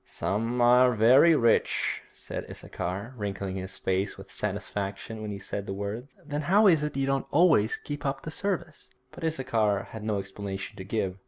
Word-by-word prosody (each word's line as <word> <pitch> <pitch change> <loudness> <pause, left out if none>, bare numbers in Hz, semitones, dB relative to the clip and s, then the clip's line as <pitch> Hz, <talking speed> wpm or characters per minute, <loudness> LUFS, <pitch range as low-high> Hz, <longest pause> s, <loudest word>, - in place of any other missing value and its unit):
'Some 115 +5 -2
are 125 +1 +6
very 130 +9 +6
rich,' 115 -5 +2
said - - -6
Issachar, 100 +8 -5
wrinkling 100 -2 -3
his 95 0 -6
face 95 +1 -1
with - - -12
satisfaction 100 +2 -3
when 105 - -4
he 100 - -4
said 100 0 -5
the 95 - -3
words. 105 +7 -5
'Then 145 0 -3
how 195 +8 +4
is 165 -7 +6
it 150 -2 -3
you 135 - +1
don't 135 0 0
always 150 - +4
keep 145 0 -6
up 135 -1 -2
the 155 - -5
service?' 170 -4 -3 0.2
But 175 - -11
Issachar 115 -10 +1
had 110 -2 -7
no 105 -1 0
explanation 95 +1 -5
to 95 - -6
give. 95 -2 -2
115 Hz, 180 wpm, -28 LUFS, 100-140 Hz, 0.2 s, are